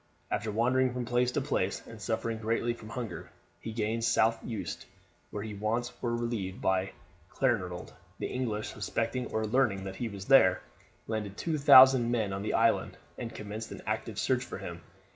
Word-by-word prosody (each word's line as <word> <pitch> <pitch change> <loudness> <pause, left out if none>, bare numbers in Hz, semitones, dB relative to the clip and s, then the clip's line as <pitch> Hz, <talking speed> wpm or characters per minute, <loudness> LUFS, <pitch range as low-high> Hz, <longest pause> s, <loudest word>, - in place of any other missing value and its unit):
After 110 0 -1
wandering 125 +3 +2
from 125 -1 -3
place 120 +1 +1
to - - +1
place 100 -8 -1
and 115 -2 -11
suffering 110 +2 -2
greatly 115 +2 0
from 110 -2 -11
hunger, 115 0 -6 0.3
he 110 - -6
gained 110 +1 -1
South 115 0 +2
Uist, 110 -4 -5 0.4
where 105 - -5
his 105 -2 -6
wants 115 +3 -1
were 120 -1 0
relieved 115 -5 -3
by 95 0 0 0.4
Clanranald. 100 -8 -1 0.2
The - - -4
English, 110 -5 -2
suspecting 125 +2 -2
or 110 0 -1
learning 110 -4 +1
that 95 0 -6
he 120 - -2
was 100 -2 -8
there, 100 -9 +6 0.5
landed 105 -3 -3
two 160 -3 -1
thousand 130 -3 +8
men 110 -5 0
on 95 - -3
the 105 - -1
island, 115 0 +2 0.2
and 115 -1 -4
commenced 105 +2 -6
an - - -8
active - - -3
search - - +1
for - - -7
him. - - -7
115 Hz, 180 wpm, -30 LUFS, 105-120 Hz, 0.5 s, thousand